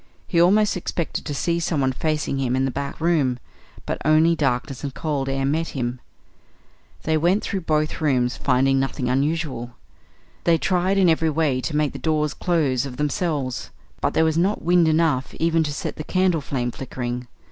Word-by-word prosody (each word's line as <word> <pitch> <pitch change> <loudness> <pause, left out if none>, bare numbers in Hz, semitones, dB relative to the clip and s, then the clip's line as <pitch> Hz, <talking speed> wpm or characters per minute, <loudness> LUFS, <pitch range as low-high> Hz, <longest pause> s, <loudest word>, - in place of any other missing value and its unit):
He 170 -3 +2
almost 205 +4 +4
expected 170 -2 -3
to 145 - -3
see 170 +4 0
someone 145 -6 0
facing 150 0 -1
him 130 -2 0
in 130 +1 +1
the 135 - -1
back 140 +2 -5
room; 155 -7 +2 0.5
but - - -3
only 155 +2 +4
darkness 135 -2 -1
and 140 -2 -4
cold 140 -4 -2
air 135 0 -1
met 160 +4 0
him. 125 0 -3 1.0
They 160 0 +1
went 175 +6 +2
through 195 - -2
both 155 -1 -1
rooms, 125 -5 +1
finding 135 0 +2
nothing 135 -1 -1
unusual. 135 -3 -1 0.7
They 170 -1 +4
tried 185 +3 +1
in 190 -2 +5
every 160 -1 +3
way 150 -4 +1
to 150 - -3
make 150 -2 +1
the - - -7
doors 150 -2 0
close 150 -8 +1
of 125 -2 -9
themselves, 150 -4 -2 0.3
but - - 0
there 160 - +4
was 160 0 +1
not 195 +5 +1
wind 175 0 +4
enough 155 -5 +1
even 165 0 +2
to 150 - -2
set 145 - -4
the 155 - -4
candle 185 -2 +1
flame 125 -3 -2
flickering. 125 -1 -5
150 Hz, 180 wpm, -23 LUFS, 135-165 Hz, 1.0 s, in